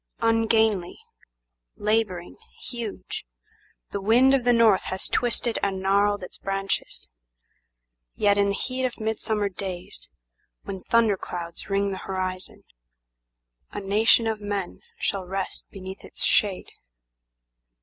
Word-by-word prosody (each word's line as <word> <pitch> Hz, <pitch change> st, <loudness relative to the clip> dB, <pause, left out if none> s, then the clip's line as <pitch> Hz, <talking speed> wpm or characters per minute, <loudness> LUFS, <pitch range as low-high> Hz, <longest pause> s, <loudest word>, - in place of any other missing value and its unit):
Ungainly, 225 Hz, -4 st, +3 dB, 0.8 s
labouring, 210 Hz, -5 st, 0 dB, 0.2 s
huge, 235 Hz, -4 st, -6 dB, 0.7 s
The 200 Hz, -, -3 dB
wind 245 Hz, +6 st, +5 dB
of 260 Hz, -3 st, +2 dB
the 245 Hz, -, +6 dB
north 230 Hz, -5 st, +5 dB
has 190 Hz, -, -3 dB
twisted 240 Hz, -1 st, 0 dB
and 195 Hz, -1 st, 0 dB
gnarled 200 Hz, +1 st, +2 dB
its 180 Hz, -, -9 dB
branches; 195 Hz, 0 st, -2 dB, 1.1 s
Yet 205 Hz, 0 st, +4 dB
in 200 Hz, 0 st, +3 dB
the 200 Hz, -, +1 dB
heat 255 Hz, +4 st, -2 dB
of 250 Hz, -2 st, -1 dB
midsummer 220 Hz, -1 st, 0 dB
days, 185 Hz, -2 st, -6 dB, 0.5 s
when 190 Hz, -1 st, -6 dB
thunder 225 Hz, -2 st, +3 dB
clouds 170 Hz, +1 st, -6 dB
ring 200 Hz, 0 st, +1 dB
the 190 Hz, -, -4 dB
horizon,A -, -, -8 dB
nation 210 Hz, +4 st, +4 dB
of 220 Hz, -1 st, -1 dB
men 205 Hz, -3 st, -3 dB, 0.2 s
shall 195 Hz, -1 st, -1 dB
rest 195 Hz, 0 st, -4 dB
beneath 190 Hz, 0 st, -8 dB
its -, -, -5 dB
shade. 200 Hz, -3 st, +2 dB
200 Hz, 120 wpm, -26 LUFS, 185-220 Hz, 1.1 s, the